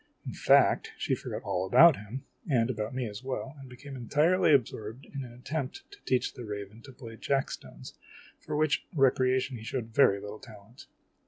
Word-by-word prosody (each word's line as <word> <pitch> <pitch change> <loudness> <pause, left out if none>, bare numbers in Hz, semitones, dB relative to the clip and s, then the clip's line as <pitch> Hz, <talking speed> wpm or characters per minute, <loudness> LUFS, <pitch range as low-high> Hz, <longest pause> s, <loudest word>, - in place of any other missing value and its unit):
In - - -5
fact, - - +4
she - - -1
forgot - - -4
all 90 - -1
about 155 - +7
him, 110 +6 -8 0.2
and 125 -3 +2
about 110 0 -4
me 130 -1 -1
as 105 +3 -8
well, 135 +1 -4
and 135 -1 -11
became 135 +2 -10
entirely 150 +9 +2
absorbed 115 -2 0
in 140 -1 -6
an 120 - -10
attempt 130 +3 -5
to - - -14
teach 130 -1 +1
the 125 - -8
raven 105 +1 -7
to 135 - -12
play 120 -3 -10
jack 135 +2 0
stones - - -9 0.5
for - - -5
which 150 -2 +1
recreation 130 -2 +2
he 110 - -10
showed 115 -1 -4
very 105 -7 +5
little 105 +1 -8
talent. 110 +3 -14
125 Hz, 185 wpm, -29 LUFS, 110-135 Hz, 0.5 s, about